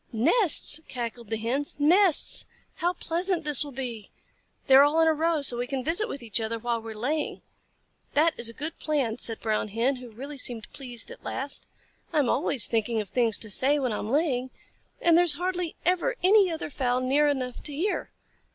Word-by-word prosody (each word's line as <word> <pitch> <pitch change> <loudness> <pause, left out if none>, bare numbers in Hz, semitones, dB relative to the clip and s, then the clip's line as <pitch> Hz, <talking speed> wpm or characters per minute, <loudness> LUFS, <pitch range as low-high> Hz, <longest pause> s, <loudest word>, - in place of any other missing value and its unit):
"Nests!" 315 - +5
cackled 235 -2 -6
the 225 - -2
Hens. 250 +6 -2
"Nests! 340 +4 +4 0.3
How 350 +1 0
pleasant 345 +1 -2
this 295 -2 +2
will 290 - -9
be! 245 -5 -6 0.6
They 265 - +2
are 270 - +9
all 295 +3 +3
in 325 - +4
a 320 - +4
row, 320 -1 -1
so 245 -3 +8
we 245 +1 -3
can 270 -1 -4
visit 345 +9 -1
with 275 - -7
each 225 0 -1
other 225 +1 -3
while 235 0 -3
we 225 0 -8
are - - -13
laying." 290 +7 -3 0.7
"That 315 +3 +3
is 235 -1 0
a - - -10
good 315 +7 -7
plan," 265 -7 -2
said 225 -1 -3
the - - -25
Brown 215 -1 -1
Hen, 235 +6 -1
who 250 -1 -11
really 275 +6 -9
seemed 235 -3 -5
pleased 245 -4 -2
at - - -13
last. 275 +2 -5 0.4
"I 325 - -2
am 280 -5 +2
always 270 -3 +2
thinking 225 0 -1
of 210 -3 -5
things 235 -4 +1
to 220 - -4
say 275 +8 +3
when 255 -5 -2
I - - -3
am 210 - -5
laying, 260 -3 0 0.5
and 340 -1 +3
there 350 - +5
is 330 - +3
hardly 355 +1 -3
ever 365 +8 0
any 395 0 +5
other 320 -2 -5
fowl 250 -2 -1
near 280 +4 +2
enough 255 -4 -3
to 300 - -5
hear. 340 +9 -3
275 Hz, 215 wpm, -26 LUFS, 235-320 Hz, 0.7 s, are